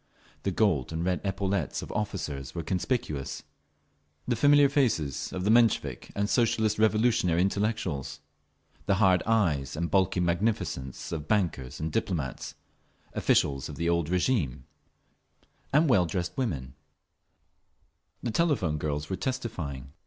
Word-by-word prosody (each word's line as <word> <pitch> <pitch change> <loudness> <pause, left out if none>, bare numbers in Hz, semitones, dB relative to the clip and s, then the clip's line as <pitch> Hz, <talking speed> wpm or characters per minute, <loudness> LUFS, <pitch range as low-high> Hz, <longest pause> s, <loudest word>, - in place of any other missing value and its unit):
The - - -1
gold 85 - +1
and 80 +1 -2
red 90 -1 0
epaulettes 95 -3 -1
of - - -8
officers 75 -11 -4
were 85 - -3
conspicuous, 80 - -2 0.8
the 125 - +1
familiar 145 +3 +6
faces 115 - 0
of 90 - -4
the 105 - +3
Menshevik 110 - +2
and 100 0 0
Socialist 110 0 +2
Revolutionary 110 -6 +3
intellectuals, 100 - -1 0.7
the 100 - +3
hard 95 -3 +4
eyes 85 -13 +1
and 85 +2 -2
bulky 95 -2 +2
magnificence 85 - -1
of 80 -2 -4
bankers 80 -10 -1
and 80 +1 -3
diplomats, 90 - -3 0.6
officials 70 -2 +1
of - - -7
the 85 0 -1
old 85 -2 +1
régime, 90 - 0 1.1
and 150 +4 +4
well 95 -10 +4
dressed 85 0 -3
women…. 70 - -3 1.5
The 120 - -1
telephone 110 - +1
girls 75 0 -2
were 95 - -3
testifying. 85 - -4
90 Hz, 130 wpm, -28 LUFS, 75-110 Hz, 1.5 s, familiar